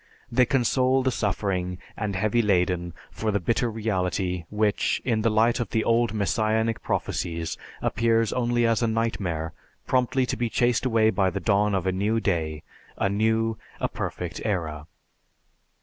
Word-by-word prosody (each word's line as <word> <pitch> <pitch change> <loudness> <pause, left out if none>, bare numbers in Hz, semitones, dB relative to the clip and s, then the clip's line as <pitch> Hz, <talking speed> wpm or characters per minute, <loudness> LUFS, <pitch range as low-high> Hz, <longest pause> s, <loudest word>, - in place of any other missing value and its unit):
They 125 +1 +4
console 130 +1 +2
the 130 - +2
suffering 95 -5 -1 0.2
and 105 -2 -3
heavy 110 +5 +2
laden 90 -4 +1 0.2
for 110 - -3
the 100 -1 +1
bitter 115 +6 0
reality 95 -5 -1
which, 105 -1 +1
in 115 -4 +1
the 115 - +2
light 115 +3 +3
of 115 -5 -2
the 110 - 0
old 115 -1 +2
messianic 110 +1 0
prophecies, 85 -1 -2 0.3
appears 115 0 +2
only 120 -1 +1
as 115 0 +2
a 115 - +2
nightmare, 100 -8 -1 0.3
promptly 130 0 +2
to - - -2
be 120 -1 -1
chased 120 +1 +2
away 110 -2 +3
by 95 -3 +2
the 100 - -3
dawn 100 +3 +2
of 95 - -1
a 95 - +2
new 105 +4 0
day, 80 -7 -1 0.3
a 95 - +1
new, 110 +2 +1 0.2
a - - +1
perfect 85 -2 -5
era. 80 -7 -2
110 Hz, 160 wpm, -25 LUFS, 95-115 Hz, 0.3 s, They